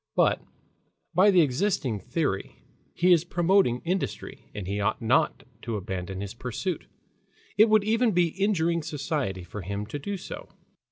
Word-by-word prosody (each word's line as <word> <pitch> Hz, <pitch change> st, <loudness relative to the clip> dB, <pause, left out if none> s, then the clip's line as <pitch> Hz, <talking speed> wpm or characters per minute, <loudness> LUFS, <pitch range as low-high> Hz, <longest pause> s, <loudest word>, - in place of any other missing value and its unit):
But -, -, +3 dB, 0.7 s
by 185 Hz, +5 st, +6 dB
the 185 Hz, -3 st, +6 dB
existing 145 Hz, -, 0 dB
theory 100 Hz, -, -2 dB, 0.4 s
he 180 Hz, +1 st, +5 dB
is 165 Hz, -2 st, +3 dB
promoting 175 Hz, -7 st, +2 dB
industry, 185 Hz, +3 st, -3 dB
and 100 Hz, -3 st, -4 dB
he 100 Hz, +2 st, -2 dB
ought 105 Hz, +2 st, 0 dB
not 125 Hz, +2 st, +2 dB, 0.2 s
to 115 Hz, -1 st, -3 dB
abandon 95 Hz, -1 st, -4 dB
his 100 Hz, -1 st, -5 dB
pursuit. 125 Hz, -, -4 dB, 0.7 s
It 215 Hz, +2 st, +6 dB
would 215 Hz, -1 st, +5 dB
even 225 Hz, +3 st, +2 dB
be 175 Hz, -3 st, +3 dB
injuring 170 Hz, -3 st, +1 dB
society 140 Hz, -, -3 dB
for 105 Hz, +3 st, -7 dB
him 100 Hz, +3 st, -4 dB
to 130 Hz, +7 st, -5 dB
do 200 Hz, +7 st, -4 dB
so. 180 Hz, -, -8 dB
150 Hz, 155 wpm, -27 LUFS, -, 0.7 s, by